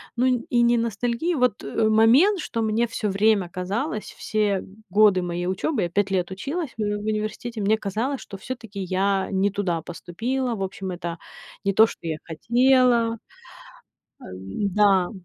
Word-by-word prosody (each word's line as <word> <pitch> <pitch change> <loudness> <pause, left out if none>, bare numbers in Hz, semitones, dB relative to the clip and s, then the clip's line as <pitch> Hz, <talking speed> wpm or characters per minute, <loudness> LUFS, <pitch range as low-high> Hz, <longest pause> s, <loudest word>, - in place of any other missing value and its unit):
ну 245 +2 +1
н 250 -2 +1
и 240 -1 +3
не 235 0 +4
ностальгии. 235 - -1
Вот, 250 -5 +1
э, 215 +10 0
момент, 255 - +5
что 230 -6 -3
мне 220 +2 +1
всё 215 -2 -2
время 200 -2 +2
казалось, 205 - -3
все 210 -3 0 0.3
годы 200 -1 +5
моей 175 0 -3
учёбы- 205 +7 -1
я 170 - -1
5 200 +2 0
лет 185 -1 0
училась 280 - -4
в - - -4
в 205 0 -2
университете- 215 +1 -3
мне 215 +2 +2
казалось, 225 +7 -3
что 195 - -9
всё-таки 225 -2 -7
я 190 +1 0
не 195 +1 +2
туда 180 -5 -1
поступила. 230 - -3
В 195 - -7
общем, 190 0 -5
это 170 -1 -5 0.5
не 195 - +2
то, 220 +3 +7
что - - -10
я 155 -1 -2
хотела. 235 +5 +3 1.0
Э, - - -11 0.5
да. 195 -3 +4
215 Hz, 165 wpm, -24 LUFS, 190-235 Hz, 1.0 s, то